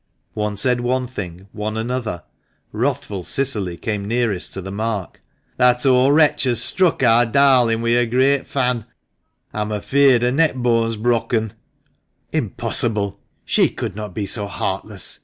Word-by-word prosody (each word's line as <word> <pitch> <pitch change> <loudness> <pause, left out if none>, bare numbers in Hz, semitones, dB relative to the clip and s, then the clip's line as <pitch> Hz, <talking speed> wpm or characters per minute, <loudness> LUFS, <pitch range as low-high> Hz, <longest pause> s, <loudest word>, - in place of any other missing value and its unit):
One 105 -1 -3
said 125 +3 +1
one 130 +1 0
thing, 95 -6 -8
one 105 +1 -4
another. 115 -6 -3 0.5
Wrathful 100 -3 -2
Cicily 105 -8 -1
came 105 -1 -3
nearest 115 -5 -1
to - - -4
the 95 - -7
mark. 105 -2 -4 0.4
"That 125 0 +3
old 130 +2 +4
wretch 150 -2 +4
has 120 -3 +1
struck 185 - +2
ar 115 +1 +5
darlin' 125 -3 +3
wi1 115 0 +2
her 120 - +3
great 130 +3 +2
fan. 125 -4 -1 0.7
A'm 105 0 -3
afeared 130 +4 +3
her 125 - +2
neckbone's 125 -6 +1
brokken! 115 -1 0 0.3
" - - -44
" - - -38
Impossible! 105 -4 -2 0.3
She - - +3
could - - -5
not 105 -3 -7
be 105 - -2
so 100 0 -2
heartless 100 - -4
115 Hz, 150 wpm, -20 LUFS, 105-125 Hz, 0.7 s, ar